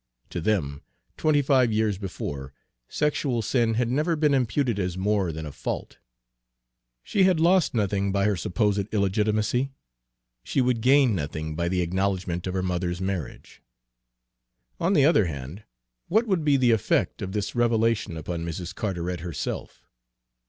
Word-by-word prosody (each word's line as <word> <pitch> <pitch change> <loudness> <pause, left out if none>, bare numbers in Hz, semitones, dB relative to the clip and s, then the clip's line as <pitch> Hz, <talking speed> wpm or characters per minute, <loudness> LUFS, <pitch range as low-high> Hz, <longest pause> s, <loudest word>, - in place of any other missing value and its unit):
To 85 - -3
them, 80 -8 -1 0.3
twenty 150 -2 +2
five 130 -4 +3
years 105 -3 0
before, 70 -8 -6 0.4
sexual 140 -5 0
sin 115 0 +1
had 120 +1 +1
never 155 +5 +1
been 150 -2 +2
imputed 125 -3 +1
as 90 -2 -2
more 100 -2 +1
than 80 0 -6
a 75 - -6
fault. - - -5 1.0
She 200 - 0
had 185 -4 +3
lost 175 -3 +3
nothing 100 -2 0
by 100 0 +1
her 105 -1 +2
supposed 100 +3 0
illegitimacy; 110 +5 +1 0.7
she - - -1
would 125 -3 +2
gain 130 -1 +5
nothing 80 -2 -4
by 85 +1 -1
the 90 0 0
acknowledgment 90 0 -1
of 90 - -3
her 95 - 0
mother's 90 -1 -2
marriage. 95 -5 -5 1.2
On 175 +4 +1
the 145 -7 +5
other 145 - +4
hand, 75 +7 -7 0.4
what 220 +6 +2
would 190 -7 0
be 145 -2 +4
the 125 -2 +4
effect 110 -4 +1
of 95 -1 -4
this 105 -1 -2
revelation 115 -6 +1
upon 85 +1 -4
Mrs. 85 +2 -5
Carteret 90 -5 -3
herself? 85 -2 -5
105 Hz, 150 wpm, -25 LUFS, 90-125 Hz, 1.2 s, gain